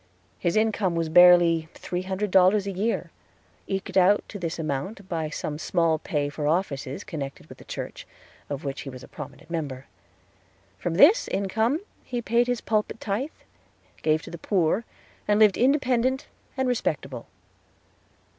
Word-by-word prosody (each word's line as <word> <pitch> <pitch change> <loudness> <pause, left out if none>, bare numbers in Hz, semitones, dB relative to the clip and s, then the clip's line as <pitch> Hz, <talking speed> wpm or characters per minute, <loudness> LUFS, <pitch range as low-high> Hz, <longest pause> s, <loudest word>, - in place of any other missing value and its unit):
His 170 - 0
income 215 -4 +1
was 165 -1 -1
barely 170 -1 +6
three 180 0 -4
hundred 190 +2 -3
dollars 190 +2 +5
a 200 - -2
year 205 +5 -2 0.6
eked 195 0 -3
out 190 +3 +4
to 205 - -7
this 170 -2 -3
amount 160 +6 -4
by 160 -3 -2
some 150 0 -4
small 165 -2 +1
pay 145 -2 -1
for 145 +1 -3
offices 150 -5 -1
connected 140 -3 -6
with - - -14
the - - -12
church, - - -7 0.4
of 140 -1 -4
which 140 -1 -4
he 140 - -7
was 130 -1 -10
a - - -11
prominent 145 +1 -10
member. 140 -6 -4 0.9
From 170 -2 -2
this 360 - +6
income 220 - 0 0.2
he 245 - -3
paid 235 +1 +2
his 245 -2 -1
pulpit 215 0 -1
tithe, 225 +8 -2 0.7
gave 155 0 +2
to - - -9
the 170 - -8
poor, 190 +4 +1 0.4
and 210 0 +3
lived 210 -3 +6
independent 260 0 +2 0.3
and 265 -1 +1
respectable. 140 - -2
180 Hz, 155 wpm, -26 LUFS, 155-215 Hz, 0.9 s, barely